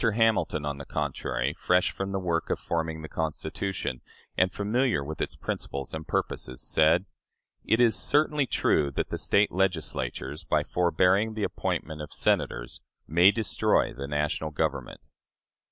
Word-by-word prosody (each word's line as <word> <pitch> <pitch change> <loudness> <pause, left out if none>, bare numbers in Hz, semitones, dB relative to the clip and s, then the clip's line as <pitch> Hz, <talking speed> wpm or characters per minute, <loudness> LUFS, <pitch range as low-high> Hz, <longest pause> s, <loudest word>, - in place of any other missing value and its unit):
Hamilton, 110 -9 +2
on 70 -1 -3
the 70 - -7
contrary, - - -2
fresh 90 0 +2
from 95 0 -4
the 95 - -1
work 85 -3 -1
of - - +1
forming 80 -1 -3
the - - -5
Constitution, 80 -2 -3 0.3
and 90 0 +3
familiar 105 - +1
with 75 +2 -6
its - - -2
principles 70 -1 -5
and 80 0 -6
purposes, 65 0 -2
said: 80 +4 +3 0.6
"It 110 - +2
is 115 -4 +5
certainly 150 -1 +2
true 75 -10 +2
that 70 - -3
the - - -2
State 100 +1 +3
Legislatures, 90 -9 -2
by - - +1
forbearing 90 +5 +2
the 110 - -2
appointment 80 -5 -2
of 75 - -8
Senators, - - 0 0.3
may 85 +4 +6
destroy 110 +1 +1
the 70 +1 -6
national 75 +2 -1
Government." 75 - -2
85 Hz, 150 wpm, -27 LUFS, 75-100 Hz, 0.6 s, may